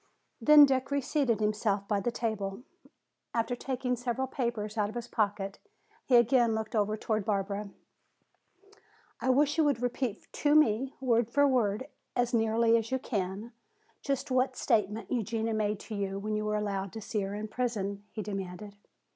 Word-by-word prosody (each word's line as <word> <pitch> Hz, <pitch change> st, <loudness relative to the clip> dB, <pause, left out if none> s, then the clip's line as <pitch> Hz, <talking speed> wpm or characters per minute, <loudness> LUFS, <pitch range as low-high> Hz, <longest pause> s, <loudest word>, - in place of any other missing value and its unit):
Then 300 Hz, -1 st, +9 dB
Dick 265 Hz, -1 st, 0 dB
reseated 280 Hz, -4 st, +1 dB
himself 210 Hz, -1 st, 0 dB
by 205 Hz, -1 st, +1 dB
the 220 Hz, -, -1 dB
tea 230 Hz, 0 st, -1 dB
table. 200 Hz, +1 st, -5 dB, 0.7 s
After 230 Hz, +1 st, 0 dB
taking 250 Hz, 0 st, -2 dB
several 245 Hz, +2 st, -2 dB
papers 235 Hz, -5 st, -3 dB
out 210 Hz, -2 st, 0 dB
of 215 Hz, -, -10 dB
his 240 Hz, 0 st, -4 dB
pocket 200 Hz, -3 st, -1 dB, 0.5 s
he 255 Hz, -, +4 dB
again 235 Hz, -1 st, +4 dB
looked 220 Hz, +1 st, -4 dB
over 210 Hz, 0 st, +1 dB
toward 215 Hz, -1 st, -1 dB
Barbara. 200 Hz, 0 st, -2 dB, 1.5 s
"I 260 Hz, -, -1 dB
wish 290 Hz, +4 st, +3 dB
you -, -, +6 dB
would 285 Hz, -5 st, +2 dB
repeat 245 Hz, -2 st, -2 dB
to 295 Hz, 0 st, +2 dB
me, 265 Hz, -3 st, +3 dB
word 235 Hz, -3 st, +2 dB
for 285 Hz, +3 st, +4 dB
word, 240 Hz, -3 st, +1 dB, 0.3 s
as 245 Hz, -1 st, +1 dB
nearly 225 Hz, 0 st, +3 dB
as 225 Hz, -1 st, -3 dB
you 260 Hz, -, +1 dB
can, 205 Hz, -1 st, -3 dB, 0.5 s
just 275 Hz, -1 st, -2 dB
what 255 Hz, 0 st, +2 dB
statement 210 Hz, +1 st, 0 dB
Eugenia 225 Hz, -1 st, -1 dB
made 210 Hz, -1 st, 0 dB
to 225 Hz, -, -8 dB
you 195 Hz, -1 st, -2 dB
when 215 Hz, +2 st, -2 dB
you 215 Hz, 0 st, -1 dB
were 210 Hz, 0 st, 0 dB
allowed 200 Hz, -2 st, -2 dB
to 220 Hz, -, -6 dB
see 210 Hz, 0 st, -2 dB
her 195 Hz, +1 st, -3 dB
in 210 Hz, +1 st, -4 dB
prison," 210 Hz, -4 st, -2 dB
he 215 Hz, -, -5 dB
demanded. 195 Hz, 0 st, -6 dB
225 Hz, 170 wpm, -30 LUFS, 205-250 Hz, 1.5 s, Then